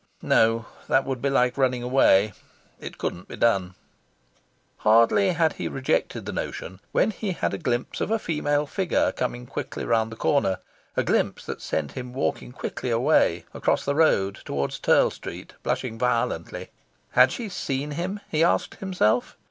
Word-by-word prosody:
No, 115 0 +3 0.2
that 135 - +3
would 130 -2 -3
be 140 - +1
like 125 -1 +2
running 125 -2 +2
away. 110 -5 +4 0.5
It - - -8
couldn't 85 - -4
be - - -8
done. 95 -6 +1 1.0
Hardly 115 - +4
had 160 -2 +2
he - - -1
rejected 135 -1 -1
the - - -4
notion 95 +2 -5
when 220 - +2
he 200 -2 -3
had - - -1
a 100 - -3
glimpse 120 0 -2
of - - -1
a 225 - +2
female 150 -6 0
figure 185 +4 +1
coming 125 -1 -3
quickly 130 - -5
round 115 -1 +1
the - - -7
corner 115 -7 +1 0.4
a - - +3
glimpse - - 0
that - - -6
sent 75 -3 -2
him 125 -1 -7
walking 130 -2 -2
quickly 125 - -5
away, 120 - +3
across - - 0
the 140 - +1
road, 100 -11 +2
towards 70 0 -3
Turl - - +4
Street, - - -9
blushing 115 -3 -2
violently. 125 -2 -1 0.4
Had 125 +1 +6
she 235 - -4
seen 145 -6 -3
him? 180 +7 -3
he 155 +1 +1
asked 170 - +1
himself. 150 - +1
125 Hz, 165 wpm, -25 LUFS, 115-150 Hz, 1.0 s, Had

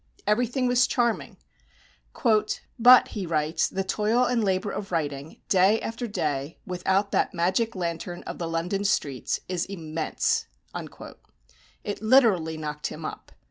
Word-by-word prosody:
Everything 245 +5 +1
was 250 0 +4
charming; 235 -2 -1 1.4
"but," 250 +2 +8
he 200 -5 -5
writes, 155 0 +1
"the 195 - -2
toil 215 +5 +1
and 245 -2 +1
labour 190 0 0
of 200 -2 -6
writing, 145 -3 -3
day 195 +3 +4
after 235 +2 -4
day, 150 -7 -2
without 190 +2 0
that - - +1
magic 190 +7 +1
lantern 175 0 -4
(of - - -7
the 170 - -2
London 175 +4 -2
streets) 140 - -1
is 180 -1 -2
IMMENSE!" 160 -4 -1 1.4
It 205 0 -4
literally 215 -10 +4
knocked 150 -1 -4
him - - -8
up. - - -7
190 Hz, 135 wpm, -26 LUFS, 165-220 Hz, 1.4 s, but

